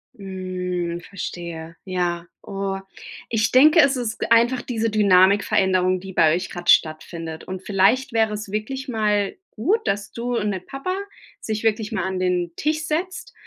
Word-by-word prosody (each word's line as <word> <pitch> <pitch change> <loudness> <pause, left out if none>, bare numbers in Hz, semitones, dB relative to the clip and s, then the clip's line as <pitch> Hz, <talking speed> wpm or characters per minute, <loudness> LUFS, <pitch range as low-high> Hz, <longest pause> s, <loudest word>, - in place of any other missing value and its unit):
Mhm, 180 -3 -4
verstehe, 170 -3 -7
ja. 175 -2 -2 0.2
Oh, 195 0 -3 0.5
ich 220 -2 +1
denke, 305 +6 +7
es 280 -2 +5
ist 235 -3 -3
einfach 240 +2 +4
diese 230 -2 -1
Dynamikveränderung, 190 -2 +3
die 190 0 -8
bei 160 -2 +4
euch 180 +2 -3
gerade 175 -1 -5
stattfindet, 160 +1 +1
und 185 0 -6
vielleicht 210 +7 +2
wäre 220 -1 +2
es 210 -1 -6
wirklich 260 +6 -4
mal 210 - 0
gut, 345 - +1
dass 200 0 -2
du 240 +1 -3
und 210 0 0
der 190 - -3
Papa 275 - -5 0.5
sich 215 0 -4
wirklich 220 -1 0
mal 210 -5 -1
an 190 -1 -2
den 180 -2 0
Tisch 310 +1 -1
setzt, 345 +4 -3
200 Hz, 155 wpm, -22 LUFS, 180-230 Hz, 0.5 s, denke